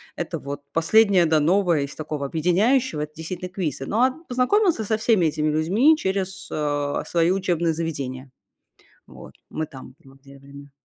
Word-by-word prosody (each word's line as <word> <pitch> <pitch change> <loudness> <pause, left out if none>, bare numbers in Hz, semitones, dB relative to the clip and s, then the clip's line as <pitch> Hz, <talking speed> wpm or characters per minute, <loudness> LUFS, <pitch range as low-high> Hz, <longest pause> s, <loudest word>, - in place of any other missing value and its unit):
Это 170 -1 -4
вот 140 0 -6
последнее, 190 +2 +4
да, 155 -1 +3
новое 170 0 +2
из 140 0 -5
такого 150 -2 -4
объединяющего- 180 - +1
это, 150 0 -5
действительно, 180 +3 -6
квизы. 160 -8 -4
Но, 225 +4 +1
а 260 - +4 0.2
познакомилась 325 - +2
я 220 - -2
со 220 +1 0
всеми 220 -5 +2
этими 155 0 0
людьми 195 - +3
через, 190 -4 -3
э, 145 -1 -1
свои 170 0 +2
учебные 175 -3 0
заведения, 140 -5 -5 0.8
вот - - -13 0.2
мы 155 - -3
там 130 -2 -12
вот 135 0 -19
делаем. 140 +1 -14
165 Hz, 160 wpm, -23 LUFS, 145-195 Hz, 0.8 s, последнее